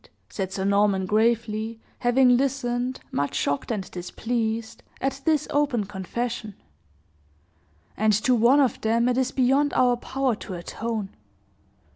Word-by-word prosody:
said 190 -2 -4
Sir 190 0 -3
Norman, 200 -1 +2
gravely, 220 +1 0 0.2
having 245 0 +4
listened, 255 -1 -1
much 140 0 -1
shocked 145 0 -1
and 210 -5 -1
displeased, 225 +4 -3 0.2
at 270 +1 -2
this 305 -2 +2
open 285 -6 +1
confession; 210 +2 -4 1.4
"and 215 0 +2
to 230 +5 +2
one 245 +4 +5
of 265 -5 +1
them 230 +2 +2
it 250 - +2
is 260 - +1
beyond 270 +3 +2
our 250 -1 +4
power 260 +1 -1
to 210 -3 -7
atone. 215 +4 -4
235 Hz, 130 wpm, -25 LUFS, 210-255 Hz, 1.4 s, one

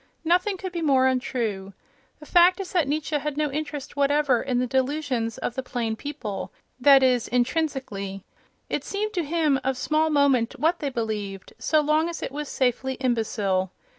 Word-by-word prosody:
Nothing 360 +4 +2
could 375 0 -5
be 345 -1 -4
more 270 -4 +3
untrue. 230 -7 -1 0.5
The 300 - -12
fact 355 +3 +5
is 385 -2 -5
that 340 -6 +2
Nietzsche 300 +1 -1
had 295 0 -4
no 300 -2 0
interest 295 -1 -5
whatever 285 -3 +2
in 255 -2 -1
the 250 - +1
delusions 260 -3 -1
of - - -3
the 260 - -3
plain 240 -3 -3
people—that 270 +1 +1
is, 250 -2 +3
intrinsically. 245 - -2 0.4
It - - -2
seemed 425 +1 -3
to 355 -4 0
him 305 -3 +1
of 265 -1 -1
small 310 +4 +1
moment 280 -6 +2
what 330 +3 +2
they 290 - -2
believed, 210 -6 -4
so 310 -1 +2
long 305 +3 +2
as 335 - -6
it - - -4
was 295 +1 -5
safely 260 +1 0
imbecile. 215 -7 0
275 Hz, 170 wpm, -25 LUFS, 245-310 Hz, 0.5 s, fact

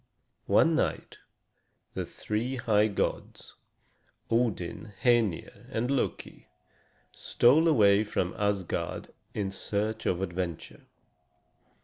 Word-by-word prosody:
One - - +4
night - - -2 0.7
the - - -4
three 115 +5 -3
high 110 -4 +2
gods, 100 - -3 0.8
Odin, 110 -4 -1
Hœnir, 115 -8 +1
and 120 +4 -1
Loki, 140 - -3 0.6
stole 150 +8 +3
away 105 -8 +5
from 95 -4 -2
Asgard 100 -3 -2 0.2
in 100 -2 -2
search 105 +3 -3
of 90 +1 0
adventure. 85 -2 -5
105 Hz, 90 wpm, -28 LUFS, 95-120 Hz, 0.8 s, away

